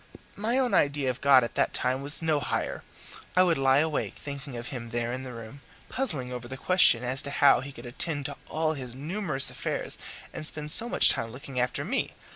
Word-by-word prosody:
My 225 +5 -1
own 255 -5 0
idea 140 -5 +1
of 125 - -11
God 135 -2 +5
at 120 - -5
that - - -1
time 130 +1 0
was 145 +4 +2
no 155 -2 +1
higher. 130 - -3 0.5
I 185 - +5
would 170 -5 +1
lie 135 0 +3
awake 155 0 -1
thinking 140 -2 -8
of 120 0 -7
him 120 -3 -7
there 120 +1 -3
in 130 - -5
the 130 -1 -8
room, 115 +4 -11 0.3
puzzling 150 - -2
over 125 -1 -7
the 130 +2 -8
question 180 -8 +3
as 130 +2 -2
to - - -7
how 140 0 +4
he 135 +3 -8
could 120 -2 -12
attend 145 +4 -4
to 145 -1 -4
all 160 0 0
his 125 -4 -7
numerous 150 -1 0
affairs - - -5 0.3
and 155 - -5
spend 150 -1 -4
so 230 +8 +10
much - - +6
time 115 0 -2
looking 130 +1 -7
after 125 0 -2
me. - - -3
140 Hz, 220 wpm, -27 LUFS, 125-155 Hz, 0.5 s, so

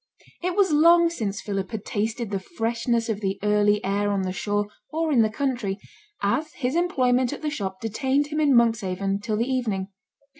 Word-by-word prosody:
It 360 0 -1
was 395 -4 +3
long 335 +3 +6
since 210 -11 -3
Philip 195 -2 -3
had 220 -3 -6
tasted 220 +1 -2
the 195 - -1
freshness 230 - -1
of 220 -2 -2
the 195 -1 -1
early 210 0 +2
air 200 +1 0
on 195 -1 0
the 185 - -2
shore, 205 +2 -1 0.2
or 320 +1 -1
in 250 -5 +5
the 220 - +3
country, 235 -5 -2 0.5
as 295 +10 0
his 255 +1 -2
employment 255 -8 +2
at 290 - -8
the 300 - -1
shop 190 -8 -4
detained 265 +6 0
him 305 0 -2
in 290 -4 +4
Monkshaven 200 -4 +1
till 215 -1 -2
the 230 - +1
evening. 225 -7 -1
230 Hz, 190 wpm, -25 LUFS, 205-280 Hz, 0.5 s, long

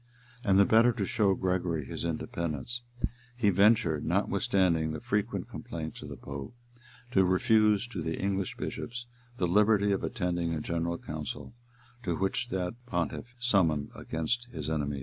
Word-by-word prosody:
[] 120 0 -25
And 100 -5 +4
the 100 - +7
better 115 +4 +6
to 105 -5 -1
show 105 -5 +2
Gregory 90 -5 0
his - - -5
independence, 85 - -3 0.6
he 105 -4 +4
ventured, 95 -6 +4
notwithstanding 85 -5 +2
the 75 - -4
frequent 105 +1 -1
complaints 80 -2 -6
of - - -8
the - - -7
pope, 70 - -7 0.6
to 95 -5 +5
refuse 105 +3 +4
to 125 - -4
the 80 - -2
English 95 -1 -1
bishops 120 +1 -4 0.3
the 90 - +1
liberty 105 +2 +4
of 100 - 0
attending 85 -6 -1
a - - -2
general 85 +2 -1
council, 75 +5 -6 0.5
which 95 +5 -1
that 95 +5 -3
pontiff 85 +2 -2
had 120 - -26
summoned 80 -11 +2
against 120 +10 -2
his 80 - -4
enemies. 75 -3 -1
95 Hz, 155 wpm, -30 LUFS, 80-110 Hz, 0.6 s, the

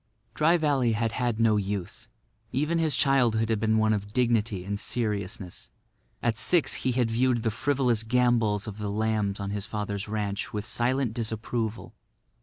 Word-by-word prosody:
Dry 165 +3 +3
Valley 140 -7 +2
had 115 +1 0
had 120 -2 -1
no 110 -2 +4
youth. 100 -2 -4 0.4
Even 150 +5 0
his 160 -3 +1
childhood 120 -5 +2
had 110 -2 +1
been 110 0 +2
one 110 0 +3
of 100 0 -4
dignity 115 -6 +1
and 100 +1 -3
seriousness. 105 -6 -3 0.5
At 115 -2 +1
six 160 +9 +3
he 125 0 -1
had 120 -2 +1
viewed 120 0 +1
the 115 - +1
frivolous 130 -1 +1
gambols 115 -3 +2
of 105 -1 -7
the 105 -1 -3
lambs 105 -1 0
on 100 0 -3
his 100 0 -4
father's 105 -1 -4
ranch 105 -1 -3
with 105 0 -4
silent 125 +1 0
disapproval. 110 -1 -3
110 Hz, 165 wpm, -27 LUFS, 105-125 Hz, 0.5 s, no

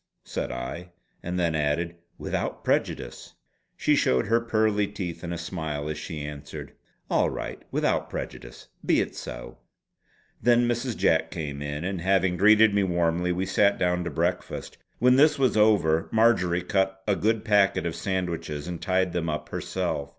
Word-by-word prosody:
said - - -3
I, 75 +9 -6 0.3
and 90 +1 -3
then 85 -2 +1
added: 80 +3 0 0.2
"Without - - -3
prejudice!" - - -2 0.4
She - - +3
showed 65 0 +2
her 115 +3 +2
pearly 110 -3 +1
teeth 95 -5 -6
in 85 - -4
a 85 - -3
smile 80 -4 -4
as 75 - -4
she 80 -5 -6
answered: 75 0 -8 0.3
"All - - +2
right. - - -6
Without - - 0
prejudice! - - -7
Be - - +3
it - - -2
so!" - - -8 0.8
Then 120 0 +4
Mrs. 120 0 -1
Jack 80 0 +2
came 75 -4 -5
in, 75 +2 -4
and 95 -1 -3
having 95 0 +2
greeted 105 +3 +6
me 100 - +3
warmly, 85 -1 +1
we 90 +2 -1
sat 100 +1 +3
down 90 -1 +1
to - - -2
breakfast. 85 +4 -2 0.2
When 125 +2 +4
this 150 +3 +5
was 130 -4 +2
over, 100 -7 +3
Marjory 90 -6 +3
cut 95 0 0
a 100 - +3
good 110 +2 0
packet 100 -4 +3
of 85 - -2
sandwiches 85 -5 -3
and 85 -1 -5
tied 95 0 +1
them 85 -2 -1
up 75 0 -4
herself. 70 0 -3
90 Hz, 165 wpm, -26 LUFS, 80-105 Hz, 0.8 s, greeted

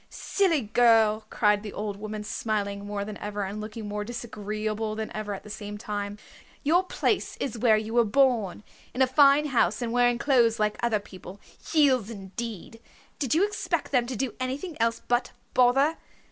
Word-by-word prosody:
"Silly 360 -7 +1
girl!" 220 -1 +3
cried 210 -1 +2
the 210 -2 -7
old 205 -1 -4
woman, 210 +1 -6
smiling 205 -2 -3
more 205 -1 -3
than 210 -1 -7
ever, 205 0 -3
and 200 +2 -5
looking 215 0 -7
more 210 0 -3
disagreeable 215 -1 -4
than 220 0 -5
ever 215 -1 -4
at - - -10
the 210 - -12
same 210 0 -6
time. 205 -1 -4 0.5
"Your 325 +5 +4
place 370 - -1
is 255 - -3
where 220 -2 +5
you 215 +1 -4
were 240 0 +5
born 225 -4 +2 0.3
in 260 - +4
a - - +6
fine 280 +2 +5
house 230 -7 +2
and 235 -1 -3
wearing 245 0 +3
clothes 235 -3 +3
like 210 0 +1
other 235 -3 +1
people. 195 -1 -12 0.2
Heels 265 -8 +3
indeed! 225 +1 -7 0.4
Did 270 -2 0
you 365 +5 +4
expect 415 - -2
them 245 -3 +2
to 255 - -4
do 260 +2 -2
any 255 +1 -2
thing 345 +1 -7
else 230 0 0
but 245 +1 0 0.2
bother? 270 +6 +4
220 Hz, 185 wpm, -27 LUFS, 210-250 Hz, 0.5 s, a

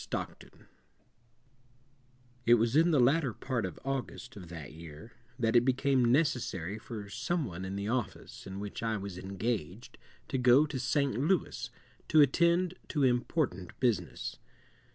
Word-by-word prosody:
STOCKTON - - -5
POMONA'S - - -24
NOVEL - - -21 1.8
It 120 - +8
was 115 +2 +1
in 165 +3 +5
the 155 -5 +4
latter 135 0 +3
part 120 -6 -2
of 90 - -9
August 130 -2 -4
of 95 -4 -9
that 75 -6 -8
year 80 +6 -11 0.3
that 115 -2 +1
it 120 - +8
became 130 -1 +2
necessary 110 - 0
for 110 -3 -7
some 165 - -1
one 90 -4 -6
in 95 +1 -4
the 100 +1 -3
office 120 -5 -3
in 95 +1 -6
which 100 0 -6
I 115 -1 0
was 100 -2 -6
engaged 100 0 -4 0.3
to 130 - -1
go 125 +4 +6
to 145 -3 -4
St. 135 +1 +1
Louis 135 -6 0 0.4
to 155 - +4
attend 170 +5 +4
to 145 -3 0
important 120 - 0
business. 105 - -1
120 Hz, 155 wpm, -31 LUFS, 100-135 Hz, 1.8 s, It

